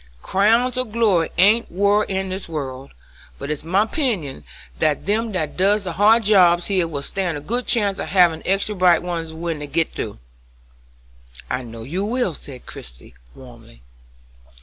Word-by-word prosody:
Crowns 230 +6 +2
of 255 -4 -2
glory 205 -8 +2
ain't 210 +6 +4
wore 205 +3 +2
in 190 0 -2
this 185 -1 -5
world, 135 -4 -6 0.5
but 140 +2 -5
it's 150 -1 -4
my 190 +6 +2
'pinion 215 - -2 0.4
that 150 -3 0
them 220 +3 0
that 160 -5 -3
does 200 +3 +2
the 180 - -4
hard 215 +5 +4
jobs 180 -4 +4
here 185 -4 +1
will 145 -3 -5
stand 175 -1 -2
a - - -5
good 240 +12 -3
chance 205 -5 +2
of - - -4
havin' 175 -4 +3
extra 195 +2 0
bright 180 -3 +3
ones 170 -2 -4
when 165 -1 -4
they 150 - -6
git 165 +3 -1
through." - - -5 1.3
"I 125 - -1
know 115 -2 -9
you 175 - -3
will," 230 -3 -1
said 135 -3 -11
Christie, - - -10 0.2
warmly. 115 - -15
180 Hz, 170 wpm, -21 LUFS, 150-205 Hz, 1.3 s, ain't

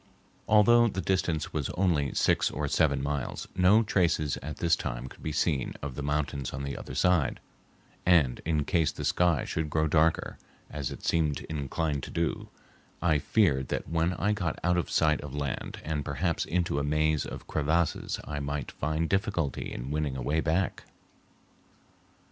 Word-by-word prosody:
Although 120 +3 +6
the 95 - -3
distance 90 -5 0
was 75 -4 -1
only 80 -7 +2
six - - +3
or 75 -1 -3
seven 70 -2 +2
miles, 70 -2 -3
no 95 +5 +5
traces 85 -8 +1
at 75 +2 -7
this 85 -1 +3
time - - -4
could 65 - -12
be 80 - -3
seen 75 -3 0
of 70 -2 -4
the 75 - -5
mountains 70 -2 -2
on 70 +1 -4
the 70 0 -4
other 65 - -7
side, 90 -1 +2 0.6
and 80 -9 +3
in 80 -3 0
case 85 -5 +2
the - - -6
sky 85 -5 +2
should 80 -1 -2
grow 80 +1 +1
darker, 80 +1 +1 0.3
as 70 -3 -3
it - - -9
seemed 80 -4 +1
inclined 75 0 -2
to - - -7
do, 85 -1 -2 0.5
I 80 -4 +2
feared 70 - +2
that - - -3
when 85 +2 +1
I 100 +3 0
got 95 -6 -1
out 90 0 +3
of 90 - -1
sight 75 -1 +2
of 75 -1 -7
land 70 -3 -4
and 75 -2 -2
perhaps 80 +4 -1
into 85 -4 0
a - - -1
maze 75 +1 +1
of - - -7
crevasses 80 +2 0
I 75 -1 -4
might 70 -1 -3
find 80 +3 -1
difficulty 85 -7 -1
in 60 +3 -5
winning 75 -3 -1
a 65 - -4
way 75 +5 +1
back. 80 +3 -1
75 Hz, 175 wpm, -29 LUFS, 70-85 Hz, 0.6 s, Although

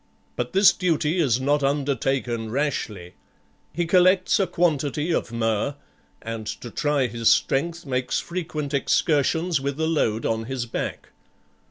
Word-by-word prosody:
But - - -3
this 195 0 +6
duty 170 -2 0
is 130 -7 +2
not 145 +2 +1
undertaken 135 -4 -1
rashly. 110 -9 -3 0.6
He 175 +2 -1
collects 185 +3 +4
a 195 - +2
quantity 155 -2 0
of - - -1
myrrh, 115 +3 -1 0.5
and 115 -1 -5
to 120 - -6
try 145 -3 +1
his 115 -1 +1
strength 170 +4 +1
makes 130 -2 -1
frequent 155 -5 -4
excursions 155 +2 +1
with 140 +1 -3
a 160 - +1
load 115 -9 0
on 115 0 -1
his 130 -1 -3
back. 115 - -5
140 Hz, 140 wpm, -24 LUFS, 120-165 Hz, 0.6 s, this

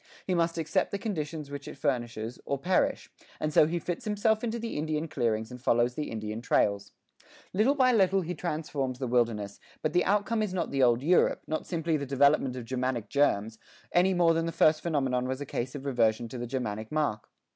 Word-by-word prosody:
He 185 - 0
must 170 -1 +1
accept 165 +4 0
the 200 - -2
conditions 155 -8 -4
which 145 0 -7
it - - -8
furnishes, 120 -4 -2
or 140 - -2
perish, 180 +7 0 0.3
and 155 0 -2
so 150 - +6
he 170 +2 -1
fits 175 0 -4
himself 215 +1 +1
into 235 0 -1
the 230 0 -5
Indian 155 +1 -2
clearings 110 -6 -1
and 125 0 -9
follows 120 0 +2
the 150 +3 -4
Indian 110 0 -5
trails. 100 -4 +1 0.6
Little 220 +9 +3
by 255 -2 +4
little 195 -3 +3
he 175 0 -4
transforms 150 -6 -3
the 130 - -3
wilderness, 115 -5 0 0.2
but 155 - 0
the 180 - +3
outcome 210 +3 +1
is 200 -3 -2
not 175 - -2
the 135 -1 0
old 120 0 +4
Europe, 175 +4 +3
not 155 - -3
simply 165 -2 0
the 140 -1 -5
development 140 -1 +3
of 125 -2 -6
Germanic 130 -2 -2
germs, 110 -6 +1 0.3
any 185 +2 +3
more 170 -1 +4
than 165 0 0
the - - -2
first 155 -1 +3
phenomenon 135 -6 0
was 130 +1 -3
a 145 - -4
case 125 -1 -4
of 140 -1 -7
reversion 115 -3 +1
to 125 - -6
the 120 - -4
Germanic 110 -4 -4
mark. 150 -9 -1
145 Hz, 210 wpm, -29 LUFS, 120-170 Hz, 0.6 s, so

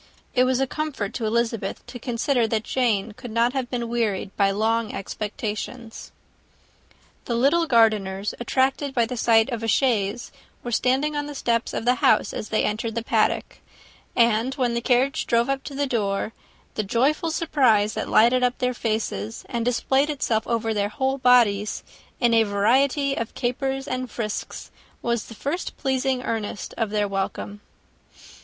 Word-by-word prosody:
It 255 -1 +4
was 255 0 +1
a 270 - +2
comfort 270 -7 -4
to 225 -3 -2
Elizabeth 230 -3 -1
to 245 0 -9
consider 240 0 0
that 220 0 -1
Jane 225 -5 0
could 245 +3 -10
not 230 +2 +1
have 260 -3 -2
been 240 -2 -2
wearied 215 -5 -1
by 200 -1 +3
long 220 +2 0
expectations. 215 +3 -5 1.1
The 235 - -1
little 295 +8 +3
Gardiners, 210 -5 +2
attracted 265 +3 0
by 235 -2 +3
the 250 +2 -5
sight 225 +1 +3
of 235 -2 -3
a 225 - -2
chaise, 225 -2 +1 0.3
were 240 - -4
standing 265 +6 +1
on 290 0 -2
the 295 - -7
steps 230 -3 0
of - - -4
the 250 - +5
house, 215 - +3
as 215 - -5
they 215 - +1
entered 220 +1 -2
the 230 - -2
paddock; - - 0 0.6
and 235 +2 +3
when 250 -3 0
the 235 - -1
carriage 260 +5 +1
drove 235 0 +2
up 275 0 -1
to 280 - -7
the 285 +1 0
door, 215 -4 -1 0.4
the - - -1
joyful 270 +11 +1
surprise 255 - +2
that - - -4
lighted 240 +3 +5
up 250 0 +1
their 250 0 0
faces 215 - -3
and 235 -1 -2
displayed 265 +4 +1
itself 235 -6 -1
over 225 -1 0
their 205 -1 0
whole 265 +4 -1
bodies, 225 -5 +3 0.4
in 240 -2 +3
a 225 - +6
variety 255 +7 +2
of 230 -4 -4
capers 270 +2 -2
and 255 -1 -3
frisks, 215 -3 -5 0.3
was 235 -2 -1
the 225 - -11
first 295 - -4
pleasing 265 -2 0
earnest 215 -4 -4
of 225 -3 -1
their 210 -1 0
welcome. 200 +1 -4
235 Hz, 170 wpm, -24 LUFS, 220-260 Hz, 1.1 s, a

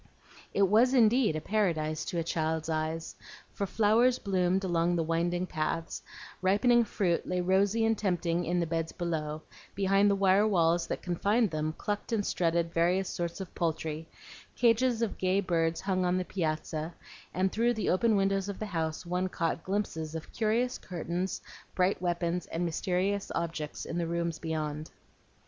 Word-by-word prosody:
It 200 - +2
was 225 +7 +4
indeed 230 -5 +4
a 155 - -2
paradise 160 -6 0
to 175 - -3
a 165 - +1
child's 160 0 -1
eyes, 160 +1 -2 0.4
for 200 - -2
flowers 225 +5 +3
bloomed 190 -1 +1
along 175 -1 +1
the 165 - +1
winding 170 +2 0
paths; 165 0 -3 0.4
ripening 230 +6 +4
fruit 180 -5 0
lay 180 0 0
rosy 195 +5 +2
and 225 0 +3
tempting 175 -4 0
in 175 +1 0
the 170 - +1
beds 165 0 -2
below; 155 -3 -3 0.3
behind 195 +1 +3
the 200 - +3
wire 195 +2 +4
walls 170 -3 +2
that - - -4
confined 200 +5 +1
them 155 0 -2
clucked 205 +3 -3
and 215 -3 +1
strutted 170 -1 0
various 180 +3 +2
sorts 170 +1 -3
of 190 -2 -7
poultry; 160 -1 -2 0.5
cages 235 0 +3
of 225 - -3
gay 185 +1 +2
birds 165 -3 0
hung 190 -1 0
on 180 0 +2
the 185 - -1
piazza; 155 -1 -3 0.4
and 185 +2 0
through 235 +2 +2
the 220 - 0
open 220 +4 +3
windows 195 0 +1
of 200 - -4
the 215 - -4
house 165 -4 -3
one 180 +2 -1
caught 165 -2 -2
glimpses 165 -5 -2
of 160 - -7
curious 235 +3 0
curtains, 175 +1 -3 0.4
bright 185 0 +1
weapons, 175 0 -1
and 170 +2 -2
mysterious 190 +4 -1
objects 165 -3 -3
in 170 - -3
the 170 - -1
rooms 170 -1 -2
beyond. 155 -1 -3
180 Hz, 165 wpm, -30 LUFS, 165-200 Hz, 0.5 s, was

